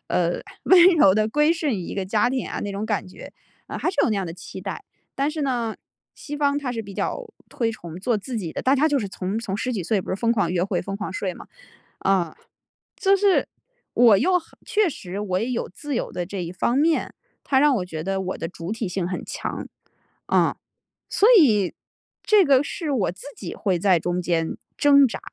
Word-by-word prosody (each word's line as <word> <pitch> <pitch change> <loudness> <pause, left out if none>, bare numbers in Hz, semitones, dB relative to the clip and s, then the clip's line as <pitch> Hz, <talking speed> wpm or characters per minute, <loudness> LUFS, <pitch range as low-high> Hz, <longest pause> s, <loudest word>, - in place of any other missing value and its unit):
呃， 175 -1 0 0.2
温 360 -2 +7
柔 190 -9 +6
地 215 +1 +2
归 300 +6 +3
顺 320 -3 -1
于 195 - -3
一 170 - -6
个 195 - -2
家 210 +5 +2
庭 260 -1 -2
啊 - - -4
那 205 - -4
种 200 +2 -3
感 210 -3 -1
觉， 185 - -11 0.4
啊 - - -5
还 - - -1
是 - - -11
有 - - +2
那 215 - +1
样 195 -2 -2
的 165 - -5
期 185 +1 -9
待。 195 - -6 0.3
但 275 +2 0
是 310 -1 -4
呢 240 -5 -1 0.4
西 295 - -7
方 285 0 +1
它 260 -4 -3
是 225 -2 -3
比 200 -2 -10
较 - - -2 0.2
推 230 -2 -1
崇 170 -7 -9
做 225 +2 +1
自 235 +5 -6
己 170 -6 -5
的， - - -4
大 265 - +4
家 305 +4 +3
就 290 -2 +2
是 205 -6 -3
从 190 +3 -3
从 205 -4 -3
十 250 +4 -2
几 205 -6 -2
岁 210 +1 +1
不 - - -7
是 185 - -1
疯 230 +3 +1
狂 200 -7 0
约 180 0 +1
会、 190 -3 -1
疯 195 +2 -4
狂 205 -2 -5
睡 190 -1 -2
吗？ - - -12 0.5
啊， 185 -4 +1 0.6
就 395 -3 +4
是 395 -1 +3 0.5
我 230 -5 +7
又 365 - +3
很 325 - -21
确 430 -3 +2
实 190 -7 -7
我 185 -3 -1
也 230 - -2
有 235 - -2
自 285 +8 -5
由 - - -2
的 175 - -3
这 190 -2 -4
一 170 - -5
方 240 +7 0
面， 320 +2 +1 0.3
它 265 -1 +2
让 290 -1 +4
我 180 - -2
觉 160 -3 -6
得 195 +1 -1
我 185 0 -4
的 - - -4
主 170 +2 -7
体 225 -1 -2
性 180 -1 -2
很 180 - -4
强， - - -5 0.6
啊， - - +2 0.5
所 415 - +4
以 210 - +4 0.5
这 425 -2 +5
个 270 -2 +5
是 310 +1 -4
我 230 -11 +1
自 185 - -14 0.2
己 - - -6
会 190 -5 0
在 185 -1 +4
中 175 +2 -1
间 165 -2 -1 0.2
挣 280 -2 +6
扎。 225 - -6
215 Hz, 245 characters per minute, -23 LUFS, 185-280 Hz, 0.6 s, 温